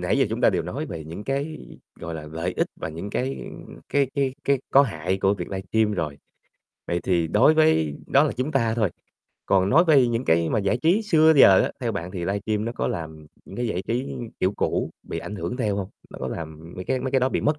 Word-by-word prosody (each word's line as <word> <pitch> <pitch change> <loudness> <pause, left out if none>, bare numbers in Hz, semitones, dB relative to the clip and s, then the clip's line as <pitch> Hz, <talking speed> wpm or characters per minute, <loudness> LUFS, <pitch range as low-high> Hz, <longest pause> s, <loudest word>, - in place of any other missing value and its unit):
nãy - - +1
giờ - - +3
chúng - - -3
ta - - +5
đều - - 0
nói - - -4
về 80 -2 -7
những 85 +6 -8
cái, 140 +5 -2 0.4
gọi 85 0 -5
là, 75 -1 -7
lợi 80 +4 -3
ích - - +1
và - - -5
những 85 +6 -6
cái 130 +5 -2 0.5
cái 140 -1 +2
cái 135 -2 0
cái 140 -1 +3
có 140 - +7
hại 95 - -2
của 95 +1 +2
việc - - -6
livestream 105 +3 0
rồi. 75 -7 -3 0.7
Vậy 85 - 0
thì 85 -3 +1
đối 105 - +5
với 155 - +3
đó 140 - +5
là 155 - 0
chúng 130 +4 -1
ta 115 -6 +1
thôi, 110 -5 +1 0.6
còn 95 -1 +3
nói 165 +5 +6
về 140 -7 +5
những 120 +1 -1
cái 80 0 +2
mà - - +1
giải 100 +3 +1
trí 180 +7 +3
xưa 160 -6 +5
giờ 95 -8 +8
á, - - -1
theo 120 -3 -1
bạn 90 -3 -4
thì 90 - -6
livestream 100 +4 -1
nó 115 - -3
có - - -2
làm 80 -2 -6 0.2
những - - -11
cái 120 - -1
giải 95 -4 -2
trí 125 +6 -3 0.2
kiểu 95 +2 +2
cũ - - -1
bị - - -5
ảnh 105 - -6
hưởng 120 +4 -4
theo 105 -6 0
hông? 95 -2 -3 0.2
Nó - - -10
có - - -4
làm 80 0 -7
mấy 90 - -6
cái 130 +4 -1
mấy 130 +1 -3
cái 135 - +3
đó 130 - +2
bị - - -1
mất 150 0 +1
105 Hz, 250 wpm, -24 LUFS, 85-135 Hz, 0.7 s, giờ